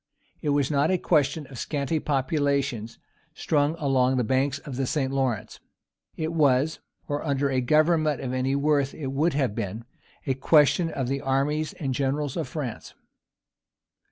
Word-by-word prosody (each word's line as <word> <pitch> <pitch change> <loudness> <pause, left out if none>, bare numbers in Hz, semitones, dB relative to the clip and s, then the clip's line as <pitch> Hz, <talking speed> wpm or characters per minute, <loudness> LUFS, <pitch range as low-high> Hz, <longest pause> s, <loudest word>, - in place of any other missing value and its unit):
It 150 - -1
was 145 0 +1
not 145 +1 +2
a 185 - +3
question 155 -2 +1
of 130 -3 -10
scanty 150 +1 -1
populations 140 -5 -1 0.4
strung 150 0 +1
along 130 -4 +2
the 125 - +2
banks 135 +4 +1
of 140 -2 -8
the 135 0 -1
St. 135 -2 -1
Lawrence; 130 -5 -2 0.6
it 160 +1 -2
was 145 0 +2 0.3
or 145 -1 -2
under 140 -2 0
a 130 -1 +1
government 155 +2 +3
of 130 -2 -4
any 130 +1 0
worth 140 -1 +1
it 135 -4 -4
would 155 +5 +1
have 135 -6 0
been 110 +1 -4 0.4
a 135 - +1
question 150 +5 +4
of 135 -5 -3
the 135 +1 -2
armies 145 +3 0
and 135 -4 -3
generals 140 +2 -1
of 160 -5 -2
France. 130 -4 -6
140 Hz, 160 wpm, -26 LUFS, 130-150 Hz, 0.6 s, question